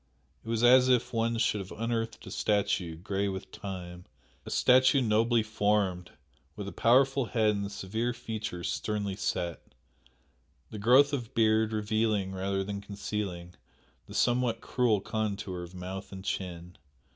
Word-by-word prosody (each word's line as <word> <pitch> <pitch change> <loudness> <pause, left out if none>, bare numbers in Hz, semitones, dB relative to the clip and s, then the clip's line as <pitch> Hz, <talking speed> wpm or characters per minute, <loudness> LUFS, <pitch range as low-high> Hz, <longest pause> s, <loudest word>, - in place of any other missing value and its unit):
It 115 - -9
was 115 0 0
as 125 +1 +7
if 125 -2 +2
one 115 0 0
should 110 -2 +1
have 95 -1 -7
unearthed 115 -1 -2
a - - -9
statue, 100 -5 0
grey 95 +4 -2
with 95 -1 -5
time 90 -4 -7 0.4
a - - -4
statue 130 +2 +5
nobly 115 0 +2
formed, 105 -4 0 0.5
with 100 -2 -6
a - - -5
powerful 135 +2 +3
head 110 -2 +2
and 100 -1 -3
severe 110 +6 -2
features 110 -6 -4
sternly 100 -2 -2
set, 85 -3 -2 1.1
the 110 - -6
growth 130 +7 +5
of 120 -5 -4
beard 110 -1 +3
revealing, 110 -2 0
rather 95 +1 -1
than 100 0 -5
concealing, 100 -4 -5 0.5
the - - -10
somewhat 120 -1 +2
cruel 115 -5 +1
contour 100 -4 -3
of 90 +1 -9
mouth 95 +2 -7
and 95 0 -9
chin. 90 -2 -5
105 Hz, 145 wpm, -29 LUFS, 95-115 Hz, 1.1 s, as